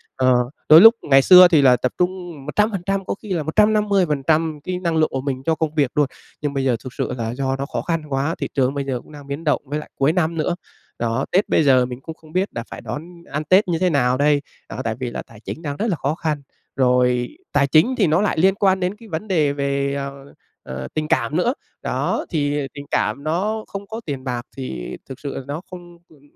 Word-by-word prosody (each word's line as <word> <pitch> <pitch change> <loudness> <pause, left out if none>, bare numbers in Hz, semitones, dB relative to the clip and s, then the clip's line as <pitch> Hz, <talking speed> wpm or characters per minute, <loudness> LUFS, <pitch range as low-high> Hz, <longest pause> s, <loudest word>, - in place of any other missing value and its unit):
Ờ, 130 -1 +3 0.4
đôi 155 +3 +10
lúc 225 +2 +9
ngày 135 -1 +5
xưa 180 +4 +9
thì 165 -4 +4
là 130 -2 +6
tập 125 +1 -1
trung 180 -5 -3
100%, 195 +2 0
có - - -2
khi 215 - -10
là 165 -4 -1
150% 165 -6 +2
cái 180 0 -3
năng 170 -3 -1
lượng 155 0 +3
của 135 - -2
mình 135 -1 -3
cho 160 +1 +1
công 155 0 -2
việc 140 -5 +2
luôn, 145 -2 +4 0.3
nhưng 145 -1 -2
bây 135 - -1
giờ 130 -2 +2
thực 130 -2 -8
sự - - -3
là 115 -1 -3
do 135 0 -1
nó 135 +1 -3
khó - - -4
khăn 165 -2 -1
quá, 140 +4 -1
thị - - -3
trường 135 -1 +1
bây 140 -1 -2
giờ 130 -3 -2
cũng - - -18
đang 145 -2 -12
biến 140 +4 -5
động 150 - +1
với 145 +3 -3
lại 150 - -10
cuối 140 +3 +2
năm 170 -2 0
nữa. 155 +2 0 0.4
Đó, 115 +2 -1
Tết 190 +3 +2
bây - - +3
giờ 130 -3 +5
mình 125 +1 -7
cũng 160 +3 -8
không 155 -1 -18
biết 185 +2 0
đà 115 - -4
phải - - -8
đón 170 +3 -8
ăn 150 +2 -2
Tết 185 +6 +4
như 170 -2 0
thế 185 0 +2
nào 130 -5 +2
đây, 145 +1 +3 0.3
đó, 115 +7 -5
tại 115 -2 -2
vì 125 -2 -3
là - - -4
tài 115 -2 -16
chính 155 - -7
đang 145 -3 -4
rất 225 - -1
là 190 - +1
khó 145 +1 -2
khăn. 155 -3 -2 0.3
Rồi 125 -1 +2 0.2
tài 140 -1 +3
chính 165 - +4
thì 200 - +3
nó 160 +4 +3
lại 210 - 0
liên 190 +3 +4
quan 190 -2 +2
đến 180 +2 -1
cái 225 0 -15
vấn 165 +5 -4
đề 155 -7 +2
về, 140 0 -1
ờ, 140 0 -6 0.3
ờ, 65 0 -6
tình 155 0 -2
cảm 130 +1 0
nữa. 235 +8 +2 0.3
Đó, - - -1
thì 145 -3 -1
tình 145 0 -8
cảm 140 - 0
nó 205 +8 -1
không 200 0 -7
có 225 +1 -6
tiền 135 -4 -4
bạc 125 -2 -3 0.2
thì 65 - -5
thực 135 - -8
sự 140 -2 -5
là - - -4
nó 145 +4 -4
không, 175 -1 -11
ừm 150 -3 -21
150 Hz, 250 wpm, -21 LUFS, 135-175 Hz, 0.4 s, đôi